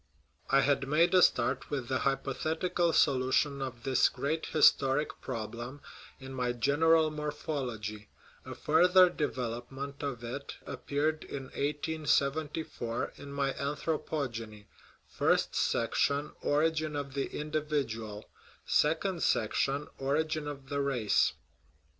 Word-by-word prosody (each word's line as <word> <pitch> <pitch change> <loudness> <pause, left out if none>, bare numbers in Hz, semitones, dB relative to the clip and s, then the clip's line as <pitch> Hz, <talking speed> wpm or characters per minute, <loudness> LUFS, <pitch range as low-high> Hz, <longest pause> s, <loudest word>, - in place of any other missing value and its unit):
I 135 - +5
had 135 -1 +1
made 165 +5 +3
a 185 - +7
start 125 -1 +2
with 135 -5 -3
the 130 0 0
hypothetical 160 +6 0
solution 135 0 +2
of 125 -3 -5
this 130 -2 +3
great 155 +3 -2
historic 145 -1 +3
problem 120 +5 -5 0.4
in 135 0 -9
my 125 -2 -1
General 155 +6 +3
Morphology; 135 -8 -4 0.3
a - - -8
further 180 +3 +5
development 135 -1 -4
of 135 -5 -4
it 135 +4 -6
appeared 155 +2 -2
in 135 - -6
1874 150 -3 -1
m 140 - -9
m 140 0 -8
y 140 -1 +1
Anthropogeny 140 -7 -3 0.4
(first - - +1
section, 145 +1 +1
Origin 155 +1 +1
of 140 -2 -4
the 140 0 -1
Individual; 140 -9 -3 0.4
second 165 +4 +1
section, 135 +6 +1
Origin 150 +2 0
of 140 -2 -7
the 140 0 -1
Race). 125 -7 +2
140 Hz, 115 wpm, -31 LUFS, 130-155 Hz, 0.4 s, a